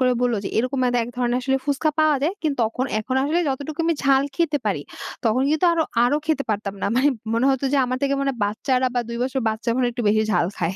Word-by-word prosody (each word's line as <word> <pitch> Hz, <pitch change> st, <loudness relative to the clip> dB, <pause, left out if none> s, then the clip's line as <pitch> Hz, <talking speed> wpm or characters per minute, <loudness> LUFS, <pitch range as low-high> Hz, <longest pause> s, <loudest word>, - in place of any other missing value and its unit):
করে 255 Hz, -1 st, +3 dB
বললো 245 Hz, -2 st, +2 dB
যে -, -, -2 dB
এরকম 255 Hz, +3 st, -1 dB
ম্যাদা 245 Hz, -1 st, +2 dB
এক -, -, -8 dB
ধরনের 245 Hz, -1 st, 0 dB
আসলে 265 Hz, +1 st, +1 dB
ফুচকা 290 Hz, +2 st, +1 dB
পাওয়া 310 Hz, -1 st, +4 dB
যায়। 320 Hz, +6 st, +1 dB
কিন্তু 300 Hz, -3 st, 0 dB
তখন 230 Hz, +4 st, -2 dB
এখন 255 Hz, +4 st, -3 dB
আসলে 310 Hz, +5 st, +1 dB
যতটুকু 285 Hz, +4 st, -4 dB
আমি 335 Hz, 0 st, +2 dB
ঝাল 270 Hz, -1 st, +4 dB
খেতে 315 Hz, -4 st, +1 dB
পারি, 185 Hz, -9 st, -1 dB, 0.4 s
তখন 230 Hz, +3 st, +2 dB
কিন্তু 310 Hz, +3 st, +1 dB
আরো, 335 Hz, -1 st, +2 dB, 0.2 s
আরো 250 Hz, +4 st, +2 dB
খেতে 310 Hz, -3 st, 0 dB
পারতাম 205 Hz, -1 st, -2 dB
না। -, -, +1 dB
মানে 270 Hz, +3 st, +4 dB, 0.2 s
মনে 230 Hz, +4 st, +2 dB
হত 265 Hz, -1 st, -1 dB
যে -, -, +3 dB
আমার 255 Hz, 0 st, -2 dB
থেকে 280 Hz, 0 st, +2 dB
মনে 275 Hz, 0 st, 0 dB
বাচ্চারা 255 Hz, +5 st, 0 dB
বা 245 Hz, -, +2 dB
২ 235 Hz, -, -4 dB
বছর 265 Hz, +1 st, -1 dB
বাচ্চা 220 Hz, +2 st, -3 dB
মনে 255 Hz, -1 st, +2 dB
একটু 240 Hz, 0 st, -4 dB
বেশি 215 Hz, +1 st, +3 dB
ঝাল 175 Hz, -2 st, +2 dB
খায়। 170 Hz, +1 st, -1 dB
255 Hz, 245 wpm, -22 LUFS, 235-285 Hz, 0.4 s, পাওয়া